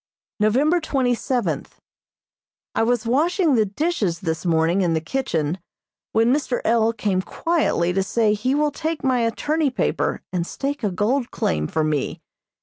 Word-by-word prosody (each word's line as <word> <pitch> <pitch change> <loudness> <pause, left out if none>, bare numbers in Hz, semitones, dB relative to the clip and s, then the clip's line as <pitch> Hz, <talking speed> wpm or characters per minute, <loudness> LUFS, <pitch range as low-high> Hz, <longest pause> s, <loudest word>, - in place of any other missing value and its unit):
November 270 +11 +3
twenty 265 -5 +1
seventh: 245 +1 -2 0.9
I - - +1
was 235 0 +1
washing 315 - +2
the 220 -4 +3
dishes 205 - -1
this 160 -1 -2
morning 165 +3 +2
in 170 -3 +1
the - - +2
kitchen, 165 - -2 0.5
when 230 +3 +3
Mr. 270 -4 0
L. 225 0 +3
came 205 -4 -1
quietly 300 - 0
to 195 - +1
say 210 +2 +2
he 250 +6 0
will 300 0 +2
take 320 +2 -3
my 260 -2 +2
attorney 290 +7 0
paper 255 - -1
and 175 -1 -1
stake 280 -1 -4
a 210 - +2
gold 230 +8 0
claim 75 -1 -1
for 160 - 0
me. 150 -2 -1
230 Hz, 155 wpm, -22 LUFS, 185-275 Hz, 0.9 s, November